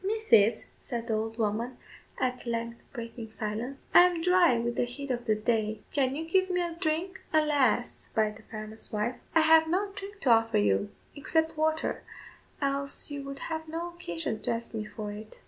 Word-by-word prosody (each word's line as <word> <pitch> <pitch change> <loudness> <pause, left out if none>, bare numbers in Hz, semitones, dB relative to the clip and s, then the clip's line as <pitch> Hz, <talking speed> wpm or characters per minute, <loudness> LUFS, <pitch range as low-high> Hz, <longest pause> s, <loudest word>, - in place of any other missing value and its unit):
"Mrs.," 385 - +4 0.2
said 235 -1 -4
the 230 - -1
old 220 +1 -2
woman, 230 +3 -1 0.4
at 250 -1 -1
length 235 0 -3
breaking 230 -2 -7
silence, 220 +5 -4
"I - - +10
am 350 -2 0
dry 360 -7 +5
with 235 +1 -1
the - - +1
heat 270 +3 -6
of 240 -1 -2
the 215 - +4
day; 215 -1 0
can 270 -2 +1
you 320 +2 -3
give 375 +2 +2
me 360 0 +1
a 345 -1 -1
drink?" 335 +2 -2
"Alas!" 290 -6 +2
replied 215 -1 0
the - - -17
farmer's 215 0 -5
wife, 215 +4 -1 0.2
"I 325 - +7
have 320 0 +6
no 390 +5 0
drink 400 0 -8
to 255 - +3
offer 225 -1 +4
you 205 0 +2 0.3
except 320 +2 0
water, 315 +1 0 0.6
else 280 +1 -1
you 285 -1 -4
would 275 0 -6
have 320 0 -4
no 335 +2 -4
occasion 215 - -4
to - - -3
ask 230 0 -2
me 215 -1 -3
for 210 0 -6
it." 215 +1 -10
250 Hz, 190 wpm, -29 LUFS, 220-320 Hz, 0.6 s, I